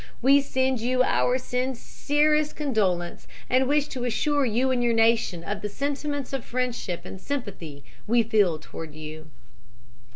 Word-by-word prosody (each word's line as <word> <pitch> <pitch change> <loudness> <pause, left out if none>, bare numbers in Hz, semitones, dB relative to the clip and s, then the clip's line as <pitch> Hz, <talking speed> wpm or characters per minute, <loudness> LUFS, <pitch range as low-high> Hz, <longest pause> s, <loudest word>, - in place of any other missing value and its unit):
We 275 +3 +5
send 260 -2 0
you 255 +2 +2
our 250 0 +2
sincerest 290 +4 0
condolence, 195 - -1 0.2
and 255 +1 +3
wish 295 +1 +2
to 255 -2 -5
assure 285 +4 +1
you 245 +4 +1
and 245 -1 +1
your 235 -1 +2
nation 225 -6 +2
of 205 +3 -4
the 210 - -3
sentiments 285 +2 -3
of 270 -3 -2
friendship 245 -8 -3
and 190 - -9
sympathy 185 - -5 0.2
we 235 +1 +4
feel 205 -7 +2
toward 155 0 -9
you." 155 0 -9
245 Hz, 150 wpm, -26 LUFS, 205-275 Hz, 0.2 s, We